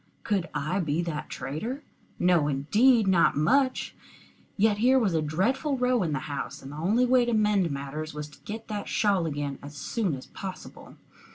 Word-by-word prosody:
Could 195 -5 -1
I 155 +7 -1
be 160 -1 0
that 155 -3 -4
traitor? 230 - -5 0.3
No 175 -4 +3
indeed 210 - +3
not 180 -6 +4
much! 260 - +2 0.6
Yet 210 0 +3
here 255 +4 +5
was 215 -8 +2
a 160 - +2
dreadful 250 - 0
row 250 -1 +2
in 165 -4 -1
the 140 -3 -1
house, 140 -2 -5
and 135 - -8
the - - -8
only 210 +10 +2
way 250 0 +4
to 240 0 -1
mend 210 -5 +2
matters 140 +2 -5
was 150 0 -6
to - - -18
get 220 +2 -7
that 210 -2 -4
shawl 195 -5 +1
again 145 -2 -3
as 145 +1 -10
soon 195 - -1
as 130 - -9
possible. 190 -1 -9
185 Hz, 185 wpm, -27 LUFS, 150-225 Hz, 0.6 s, here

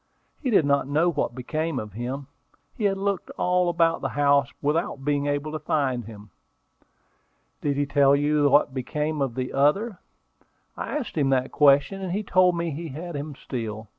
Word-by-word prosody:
He 270 - -1
did 200 -10 +4
not 140 -1 +2
know 155 +5 +2
what 140 -6 -2
became 155 +4 -3
of 105 -5 -5
him. 125 +5 -4 0.5
He 215 - -3
had 195 -1 +2
looked 200 -1 -2
all 180 0 +2
about 165 -1 +2
the - - -1
house 140 -3 +2
without 145 -2 -1
being 145 -1 0
able 145 +1 -1
to 155 - -4
find 135 -6 -1
him." 105 -2 -12 1.3
"Did 140 -2 -1
he 145 - +1
tell 140 -1 +4
you 145 0 +2
what 145 0 +4
became 150 +4 -2
of 130 -4 -1
the 130 -1 -3
other?" 185 +10 +1 0.8
"I - - -3
asked 265 -7 -5
him 140 -2 +2
that 130 -1 +1
question, 145 +6 +4
and 185 -2 -3
he 210 +2 -1
told 185 -3 +3
me 170 -1 -2
he 165 +4 -5
had 160 +4 -7
him 145 0 -5
still. 110 -4 -6
145 Hz, 185 wpm, -25 LUFS, 135-170 Hz, 1.3 s, did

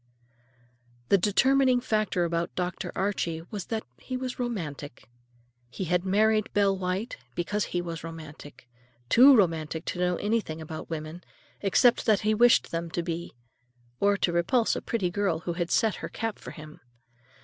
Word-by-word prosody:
The 200 - +6
determining 260 +6 +3
factor 215 -7 0
about 170 0 -2
Dr. 180 -1 -3
Archie 175 -4 -1
was 205 -4 -5
that 220 -1 -3 0.2
he 255 - -5
was 255 0 -5
romantic. 150 - -5 0.6
He 190 - -5
had 180 0 +1
married 215 +3 +2
Belle 200 -1 +3
White 190 +5 -3 0.2
because 205 +4 -1
he 175 0 -2
was 165 -2 -6
romantic—too 145 - +1
romantic 165 -4 0
to 180 - -4
know 180 0 +1
anything 205 -6 -1
about 155 0 -7
women, 160 +2 -6 0.4
except 235 +6 +3
what 215 -3 +4
he 215 +1 +2
wished 240 +2 +4
them 170 0 -3
to 170 +1 -3
be, 170 -3 -5 0.6
or 200 0 +3
to 175 - 0
repulse 220 +8 +2
a - - -3
pretty 195 -7 -1
girl 180 -4 0
who 175 - -3
had 170 0 -2
set 220 -3 +2
her - - -6
cap 225 -1 -4
for - - -9
him. 155 -1 -11
180 Hz, 160 wpm, -27 LUFS, 165-215 Hz, 0.6 s, The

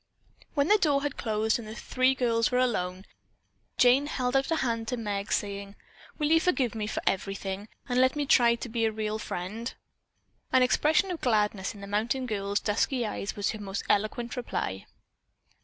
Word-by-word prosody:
When 285 0 +2
the 420 +2 +5
door 285 -6 +2
had 290 -2 -2
closed 220 0 0
and 225 - -8
the 215 - -7
three 255 +2 +1
girls 230 -3 +2
were 250 - 0
alone, 190 -7 0 0.7
Jane 255 +4 +5
held 255 -3 -1
out 270 0 +2
a 325 - +2
hand 230 -6 -1
to 250 - -2
Meg, 205 -3 -3
saying: 200 0 -2 0.4
"Will 300 -1 0
you 325 - +6
forgive 280 - +1
me 215 -2 -3
for - - -3
everything, 195 +1 -2 0.2
and 250 0 +2
let 260 +2 +3
me 295 -1 -1
try 235 -3 +5
to 235 - -6
be 225 -1 0
a 220 - +1
real 215 0 -3
friend?" 215 +6 -5 0.8
An 260 -1 +5
expression 310 +9 +3
of 345 - -5
gladness 210 -5 +1
in 200 - -11
the - - -6
mountain 225 +6 -1
girl's 205 -3 -1
dusky 235 +4 0
eyes 205 -1 -4
was 205 -1 0
her 215 - -7
most 195 -1 -4
eloquent 230 +4 0
reply. 95 - -3
230 Hz, 190 wpm, -28 LUFS, 205-260 Hz, 0.8 s, you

